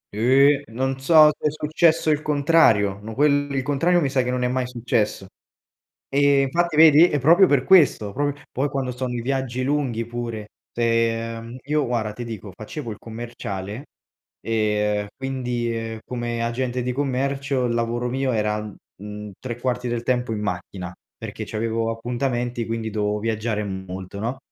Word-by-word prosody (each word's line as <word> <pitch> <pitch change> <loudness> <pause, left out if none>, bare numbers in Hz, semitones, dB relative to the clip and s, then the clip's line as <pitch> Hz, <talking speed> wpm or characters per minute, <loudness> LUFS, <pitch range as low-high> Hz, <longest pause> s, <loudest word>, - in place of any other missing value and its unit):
Eh, 135 +5 +4
non 130 +3 -2
so, 150 +2 +7
se - - 0
è - - +3
successo 155 +2 +2
il 150 0 +1
contrario, 140 -10 +3
ma 110 +1 -8
quel 145 0 +2
il 135 -1 -1
contrario 165 +6 +2
mi 145 -5 0
sa 130 -1 +2
che 125 - -2
non 125 0 -1
è - - +2
mai 125 0 -1
successo. 120 -5 -1 0.8
Eh, 140 0 +3
infatti 170 +4 0
vedi? 160 +2 +8
E 145 - 0
proprio 170 +8 +6
per 140 -5 +2
questo, 135 - +4
proprio 145 +2 -2
poi 140 +3 0
quando 135 -2 -2
sto 125 +1 -4
nei 125 -1 -3
viaggi 130 0 -2
lunghi 130 -5 -1
pure, 115 -2 -5 0.3
uhm, 115 0 -1
io 150 +1 0
guarda 115 -3 -2
ti 120 +3 -6
dico, 105 -4 -7
facevo 115 +5 -7
il 105 - -7
commerciale, 115 -1 -6 0.6
uhm, 105 -2 0
quindi, 125 -3 -2
uhm, 115 -1 -5
come 120 -1 -3
agente 125 +1 -2
di 125 +1 -2
commercio 135 0 -1
il 120 - 0
lavoro 120 +1 -1
mio 130 +1 -1
era, 105 -1 0
mhmm, 105 0 -10
3 120 -2 -5
quarti 125 -1 -2
del 120 0 -2
tempo 125 -1 0
in 110 - -2
macchina, 90 -2 -5 0.2
perché - - -6
c'avevo 115 +1 -2
appuntamenti, 120 0 -2
quindi 115 -1 -3
dovevo 105 0 -1
viaggiare 110 0 -1
molto, 95 0 -6
no, 120 +4 -2
120 Hz, 165 wpm, -23 LUFS, 110-135 Hz, 0.8 s, vedi